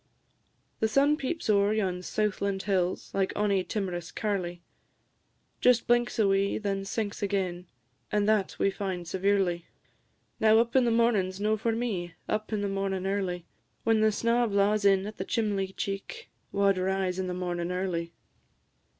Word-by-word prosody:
The 220 Hz, -, +2 dB
sun 280 Hz, +6 st, +3 dB
peeps 310 Hz, +3 st, -3 dB
ower 205 Hz, -1 st, +3 dB
yon 185 Hz, -4 st, -1 dB
southland 200 Hz, 0 st, -1 dB
hills, 185 Hz, -3 st, -1 dB
Like 195 Hz, -1 st, +1 dB
ony 200 Hz, -2 st, +2 dB
timorous 180 Hz, -5 st, -4 dB
carlie; 180 Hz, -5 st, -3 dB, 1.0 s
Just 250 Hz, -1 st, +4 dB
blinks 240 Hz, 0 st, +2 dB
a 215 Hz, -3 st, +4 dB
wee, 195 Hz, 0 st, +2 dB
then 195 Hz, -2 st, -2 dB
sinks 205 Hz, 0 st, -3 dB
again; 185 Hz, -3 st, -2 dB, 0.4 s
And 210 Hz, -1 st, +1 dB
that 215 Hz, -3 st, +2 dB
we 195 Hz, -, +2 dB
find 185 Hz, -4 st, -4 dB
severely. 190 Hz, -2 st, 0 dB, 0.7 s
Now, 220 Hz, 0 st, +5 dB
up 235 Hz, +2 st, +2 dB
in 260 Hz, -2 st, +5 dB
the -, -, +3 dB
mornin's 220 Hz, -5 st, +2 dB
no 215 Hz, +1 st, +2 dB
for 225 Hz, +1 st, -1 dB
me, 195 Hz, -8 st, -3 dB
Up 215 Hz, +1 st, -2 dB
in 215 Hz, -2 st, -1 dB
the 205 Hz, -, 0 dB
mornin' 195 Hz, -1 st, -2 dB
early; 190 Hz, -3 st, -2 dB, 0.4 s
When 225 Hz, -1 st, +3 dB
snaw 235 Hz, +3 st, +2 dB
blaws 200 Hz, 0 st, +2 dB
in 195 Hz, -1 st, +4 dB
at 210 Hz, +1 st, -7 dB
the -, -, -2 dB
chimley 200 Hz, -4 st, -1 dB
cheek, 195 Hz, 0 st, -5 dB, 0.2 s
Wha 200 Hz, 0 st, +3 dB
'd 190 Hz, -, -2 dB
rise 190 Hz, 0 st, 0 dB
in 185 Hz, -, -1 dB
the 180 Hz, -, -3 dB
mornin' 175 Hz, -1 st, -2 dB
early? 180 Hz, -2 st, -2 dB
200 Hz, 160 wpm, -28 LUFS, 185-215 Hz, 1.0 s, Now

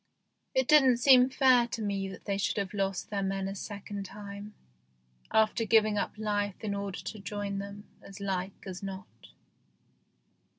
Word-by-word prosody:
It 260 Hz, -1 st, +2 dB
didn't 270 Hz, -5 st, +6 dB
seem 255 Hz, +1 st, +7 dB
THE 250 Hz, -, +4 dB
GHOST 260 Hz, -, -11 dB
SHIP -, -, -19 dB
19 255 Hz, -1 st, +8 dB
fair 235 Hz, -, +1 dB
to 230 Hz, -, -5 dB
me 200 Hz, -1 st, -1 dB
that 190 Hz, -, -10 dB
they 200 Hz, -1 st, -1 dB
should 200 Hz, -, 0 dB
have 200 Hz, -1 st, -2 dB
lost 195 Hz, -1 st, -2 dB
their 200 Hz, -1 st, -1 dB
men 195 Hz, 0 st, -1 dB
a 195 Hz, -, -4 dB
second 200 Hz, 0 st, -6 dB
time, 205 Hz, +1 st, -9 dB, 0.8 s
after 220 Hz, +1 st, +3 dB
giving 215 Hz, -1 st, +3 dB
up -, -, -3 dB
life 205 Hz, -2 st, -1 dB
in 205 Hz, -2 st, -1 dB
order 200 Hz, -1 st, -4 dB
to 220 Hz, -, -7 dB
join 200 Hz, 0 st, -4 dB
them, 200 Hz, +1 st, -7 dB, 0.2 s
as 195 Hz, +1 st, -11 dB
like 190 Hz, -1 st, -3 dB
as 185 Hz, -1 st, -6 dB
not. 190 Hz, -1 st, -6 dB
200 Hz, 185 wpm, -30 LUFS, 195-215 Hz, 0.8 s, 19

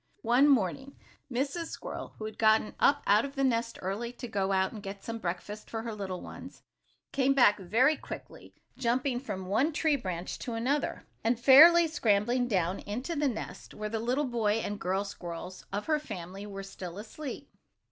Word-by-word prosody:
One 250 Hz, +5 st, +5 dB
morning 270 Hz, +2 st, +1 dB, 0.4 s
Mrs. 280 Hz, +7 st, -1 dB
Squirrel, -, -, -7 dB
who 215 Hz, -, -6 dB
had 215 Hz, -, -7 dB
gotten 220 Hz, -1 st, +4 dB
up 285 Hz, 0 st, +4 dB
out 205 Hz, +3 st, +5 dB
of 280 Hz, 0 st, -6 dB
the 275 Hz, -, 0 dB
nest 230 Hz, -3 st, 0 dB
early, 205 Hz, +6 st, -3 dB
to 245 Hz, 0 st, -7 dB
go 195 Hz, -3 st, -1 dB
out 190 Hz, 0 st, +2 dB
and 215 Hz, -, -8 dB
get 195 Hz, 0 st, -7 dB
some 230 Hz, 0 st, -5 dB
breakfast 195 Hz, +3 st, -5 dB
for 225 Hz, -1 st, -4 dB
her 230 Hz, -1 st, -4 dB
little 190 Hz, -3 st, -5 dB
ones, -, -, -10 dB, 0.5 s
came 275 Hz, 0 st, +2 dB
back 215 Hz, -6 st, +5 dB
very 230 Hz, -, +3 dB
quickly, -, -, -10 dB, 0.2 s
jumping 250 Hz, +1 st, 0 dB
from 205 Hz, -7 st, -5 dB
one 225 Hz, -, +2 dB
tree 305 Hz, 0 st, +2 dB
branch 185 Hz, -8 st, -4 dB
to 240 Hz, -, -5 dB
another, 265 Hz, +6 st, -1 dB, 0.2 s
and 230 Hz, +1 st, +1 dB
fairly 330 Hz, +7 st, +9 dB
scrambling 245 Hz, -4 st, +1 dB
down 185 Hz, -4 st, 0 dB
into 250 Hz, +11 st, -4 dB
the 290 Hz, -1 st, +1 dB
nest 240 Hz, -5 st, -6 dB
where 215 Hz, 0 st, -4 dB
the 225 Hz, +1 st, -2 dB
little 250 Hz, +6 st, 0 dB
boy 230 Hz, -5 st, +1 dB
and 205 Hz, -2 st, -2 dB
girl 190 Hz, +2 st, 0 dB
squirrels 180 Hz, -1 st, -8 dB
of 205 Hz, +2 st, -3 dB
her 310 Hz, -1 st, +2 dB
family 195 Hz, -, -7 dB
were 195 Hz, -1 st, -6 dB
still 185 Hz, -2 st, -8 dB
asleep. 250 Hz, +7 st, -7 dB
225 Hz, 185 wpm, -30 LUFS, 200-265 Hz, 0.5 s, fairly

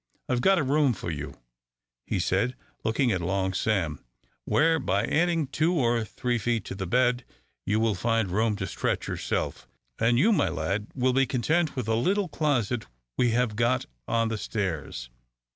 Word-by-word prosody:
I've 125 Hz, -1 st, 0 dB
got 195 Hz, +7 st, +4 dB
a 165 Hz, -, +2 dB
room 140 Hz, -1 st, +3 dB
for 85 Hz, -, -5 dB
you," 75 Hz, -2 st, -6 dB, 0.7 s
he -, -, 0 dB
said, 95 Hz, +8 st, +1 dB, 0.3 s
looking 120 Hz, +3 st, +1 dB
at 95 Hz, -3 st, 0 dB
Long 95 Hz, +2 st, 0 dB
Sam, 90 Hz, -7 st, -1 dB, 0.4 s
"where, 160 Hz, +1 st, +3 dB
by -, -, 0 dB
adding 165 Hz, -1 st, +2 dB
two 155 Hz, +6 st, 0 dB
or 120 Hz, -6 st, +2 dB
three 120 Hz, +2 st, -2 dB
feet 115 Hz, -2 st, -1 dB
to -, -, -5 dB
the 95 Hz, -1 st, -4 dB
bed, 125 Hz, +4 st, +2 dB, 0.4 s
you 105 Hz, +2 st, +2 dB
will 110 Hz, -1 st, +2 dB
find 110 Hz, 0 st, 0 dB
room 110 Hz, +2 st, +1 dB
to 100 Hz, -2 st, -3 dB
stretch -, -, -2 dB
yourself; -, -, -3 dB, 0.3 s
and 120 Hz, +1 st, +3 dB
you, 210 Hz, -, +4 dB
my -, -, +2 dB
lad, 95 Hz, +7 st, -2 dB
will 130 Hz, 0 st, +2 dB
be 135 Hz, 0 st, +3 dB
content 155 Hz, +6 st, +1 dB
with 125 Hz, -5 st, -3 dB
a 110 Hz, -, +1 dB
little 190 Hz, -, +1 dB
closet 130 Hz, -7 st, 0 dB, 0.3 s
we 125 Hz, -, +3 dB
have 115 Hz, -1 st, +1 dB
got 120 Hz, +3 st, +1 dB, 0.2 s
on 115 Hz, 0 st, +1 dB
the 110 Hz, -1 st, -3 dB
stairs. 80 Hz, -, -3 dB
115 Hz, 175 wpm, -27 LUFS, 105-130 Hz, 0.7 s, got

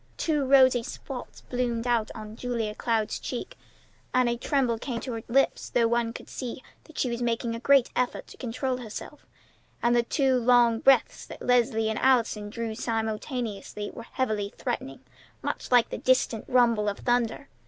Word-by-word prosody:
Two 300 Hz, -3 st, +1 dB
rosy 260 Hz, -2 st, +6 dB
spots 250 Hz, +2 st, -8 dB
bloomed 245 Hz, -2 st, -2 dB
out 235 Hz, -3 st, +1 dB
on 215 Hz, -1 st, -8 dB
Julia 230 Hz, -3 st, -2 dB
Cloud's 220 Hz, -1 st, -1 dB
cheeks, -, -, -5 dB, 0.6 s
and 255 Hz, -1 st, +4 dB
a 235 Hz, -, +1 dB
tremble 245 Hz, -2 st, 0 dB
came 245 Hz, 0 st, -4 dB
in 230 Hz, -, -3 dB
her 225 Hz, -, -4 dB
lips, 270 Hz, +3 st, +1 dB
though 235 Hz, -2 st, +3 dB
one 235 Hz, 0 st, +1 dB
could -, -, -10 dB
see 255 Hz, 0 st, -6 dB, 0.3 s
she 250 Hz, -, 0 dB
was 235 Hz, +1 st, -3 dB
making 235 Hz, 0 st, -1 dB
a 230 Hz, -, -4 dB
great 275 Hz, 0 st, +4 dB
effort 250 Hz, 0 st, -1 dB
to -, -, -14 dB
control 255 Hz, +2 st, -2 dB
herself; 245 Hz, +4 st, -9 dB, 0.6 s
and 240 Hz, 0 st, +4 dB
the 240 Hz, -, +5 dB
two 260 Hz, +1 st, +1 dB
long 240 Hz, -1 st, +4 dB
breaths 270 Hz, +2 st, +3 dB
that -, -, -9 dB
Leslie 230 Hz, -3 st, +2 dB
and 220 Hz, -1 st, -1 dB
Allison 230 Hz, -5 st, +2 dB
drew 225 Hz, +1 st, -4 dB
simultaneously 220 Hz, -2 st, -3 dB
were -, -, -9 dB
heavily 215 Hz, -4 st, -2 dB
threatening, -, -, -4 dB, 0.4 s
much -, -, -4 dB
like 245 Hz, -2 st, +5 dB
the -, -, -4 dB
distant 255 Hz, -3 st, +1 dB
rumble 235 Hz, -4 st, +3 dB
of 200 Hz, -, -4 dB
thunder. 245 Hz, +2 st, 0 dB
235 Hz, 170 wpm, -27 LUFS, 225-250 Hz, 0.6 s, rosy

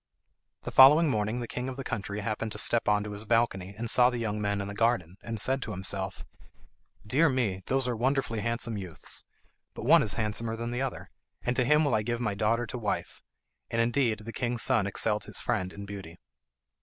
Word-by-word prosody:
The -, -, -5 dB
following 150 Hz, +5 st, +8 dB
morning 110 Hz, 0 st, -1 dB
the 120 Hz, -, -4 dB
king 125 Hz, +2 st, -4 dB
of 130 Hz, -, -7 dB
the 135 Hz, -, -4 dB
country 105 Hz, -4 st, -4 dB
happened 110 Hz, +1 st, -3 dB
to -, -, -6 dB
step 115 Hz, -, +2 dB
on 105 Hz, 0 st, +3 dB
to 105 Hz, -, -6 dB
his 105 Hz, +1 st, -6 dB
balcony, 105 Hz, -4 st, 0 dB
and 115 Hz, +1 st, -3 dB
saw 125 Hz, +2 st, +5 dB
the 125 Hz, -, -3 dB
young 105 Hz, -2 st, -2 dB
men 100 Hz, -1 st, 0 dB
in 100 Hz, -, -3 dB
the 100 Hz, -, -6 dB
garden, 105 Hz, -6 st, +1 dB
and 115 Hz, -2 st, -4 dB
said 135 Hz, +6 st, +4 dB
to 110 Hz, -, -5 dB
himself, 95 Hz, +1 st, -4 dB, 0.8 s
"Dear 145 Hz, +9 st, +3 dB
me, 115 Hz, -8 st, -1 dB
those 135 Hz, -1 st, +1 dB
are 125 Hz, -, -1 dB
wonderfully 125 Hz, -1 st, 0 dB
handsome 115 Hz, 0 st, -2 dB
youths; 90 Hz, -4 st, -7 dB, 0.5 s
but -, -, -6 dB
one -, -, +7 dB
is 100 Hz, -, -1 dB
handsomer 110 Hz, +1 st, -2 dB
than 115 Hz, +1 st, -4 dB
the 120 Hz, +2 st, -2 dB
other, 135 Hz, -1 st, -4 dB, 0.3 s
and 125 Hz, -, 0 dB
to 125 Hz, -, +2 dB
him 150 Hz, +4 st, +4 dB
will 140 Hz, -, +1 dB
I 110 Hz, -, +3 dB
give 120 Hz, +2 st, -2 dB
my 110 Hz, -4 st, -1 dB
daughter 110 Hz, +4 st, +1 dB
to 125 Hz, -, -6 dB
wife;" 105 Hz, -3 st, -3 dB, 0.5 s
and 115 Hz, -, -1 dB
indeed 115 Hz, -1 st, +2 dB
the 115 Hz, +2 st, -8 dB
king's 120 Hz, -1 st, -1 dB
son 105 Hz, -3 st, +2 dB
excelled 105 Hz, +2 st, -1 dB
his -, -, -8 dB
friend 95 Hz, 0 st, -2 dB
in 100 Hz, 0 st, -8 dB
beauty. 95 Hz, -4 st, -9 dB
115 Hz, 220 wpm, -29 LUFS, 105-125 Hz, 0.8 s, following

